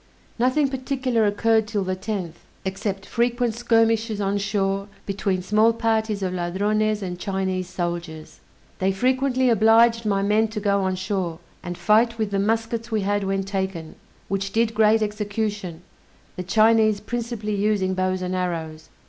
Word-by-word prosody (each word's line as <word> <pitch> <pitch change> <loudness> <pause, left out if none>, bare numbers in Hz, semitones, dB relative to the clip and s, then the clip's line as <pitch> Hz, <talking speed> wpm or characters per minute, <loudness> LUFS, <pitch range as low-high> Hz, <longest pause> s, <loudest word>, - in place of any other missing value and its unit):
Nothing 255 +4 +3
particular 260 -4 0
occurred 220 +1 +2
'till 210 -3 -1
the 185 0 -2
10th, 185 -4 -4 0.3
except 195 0 -3
frequent 240 0 0
skirmishes 225 -2 +1
on 200 0 0
shore 195 0 -1 0.2
between 195 -2 -1
small 215 +4 +3
parties 220 -3 0
of 185 -1 -1
Ladrones 205 +4 0
and 180 -1 -5
Chinese 190 -1 -2
soldiers. 170 -3 -5 0.4
They 190 +1 +2
frequently 260 +4 +1
obliged 230 +1 +5
my 195 -1 +1
men 210 +2 +3
to 215 0 -5
go 200 -1 +1
on 190 -1 0
shore, 185 -3 -2 0.2
and 175 -1 -6
fight 230 +2 +3
with 215 -2 -2
the 200 - 0
muskets 225 +2 -1
we 220 -2 0
had 205 +1 0
when 195 0 -1
taken, 190 -4 -4 0.3
which 195 0 -2
did 225 +1 +1
great 220 0 +4
execution, 210 -4 -3 0.5
the - - -4
Chinese 215 +2 +3
principally 230 -1 -4
using 200 -2 +1
bows 185 0 -1
and 180 0 -3
arrows. 165 -4 -4
205 Hz, 150 wpm, -23 LUFS, 190-225 Hz, 0.5 s, obliged